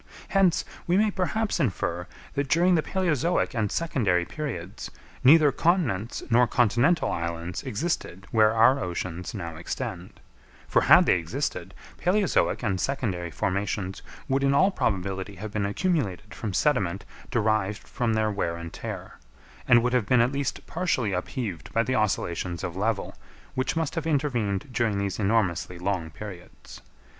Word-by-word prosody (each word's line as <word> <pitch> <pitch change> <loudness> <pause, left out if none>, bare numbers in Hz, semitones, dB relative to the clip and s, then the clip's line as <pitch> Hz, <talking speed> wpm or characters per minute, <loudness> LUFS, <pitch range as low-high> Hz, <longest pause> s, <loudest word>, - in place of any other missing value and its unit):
Hence, 195 -4 +3 0.2
we 175 +2 +3
may 215 +1 +3
perhaps 205 +2 -1
infer, 90 - -1 0.3
that 140 -1 -2
during 175 +4 +4
the 165 - +4
palæozoic 170 -3 0
and 110 -4 -1
secondary 105 - +1
periods, 100 - -6 0.3
neither 150 +2 +7
continents 135 - 0
nor 120 +1 +5
continental 120 - +2
islands 85 +1 -3
existed 115 - -3
where 110 -1 +5
our 115 +5 +5
oceans 90 0 -4
now 85 -1 -5
extend; 85 +2 -6 0.5
for - - +3
had - - +7
they - - +4
existed, 90 - -4 0.3
palæozoic 185 -7 +2
and 95 -5 0
secondary 100 -11 -2
formations 95 +1 -2 0.3
would 135 0 +1
in 140 0 +3
all 190 +7 +5
probability 95 - -2
have 105 +3 -7
been 105 -2 -1
accumulated 105 - -1
from 105 - -4
sediment 100 -5 +1 0.2
derived 110 -3 0
from 120 -4 -1
their 110 0 +1
wear 85 -4 -1
and 85 -1 -8
tear; - - -7 0.5
and 120 -1 +6
would 125 0 +1
have 120 -5 +2
been 125 - +4
at 120 +2 +3
least 140 -1 -3
partially 155 - -1
upheaved 95 -1 -4
by 115 - +3
the 130 - -1
oscillations 90 -6 -1
of 85 - -4
level, 105 +1 -1 0.4
which 130 +3 -1
must 160 -3 -1
have 165 -2 -3
intervened 125 -9 0
during 115 -4 0
these 100 0 -2
enormously 95 -4 +1
long 90 -2 -2
periods. 90 +1 -11
110 Hz, 150 wpm, -26 LUFS, 95-140 Hz, 0.5 s, neither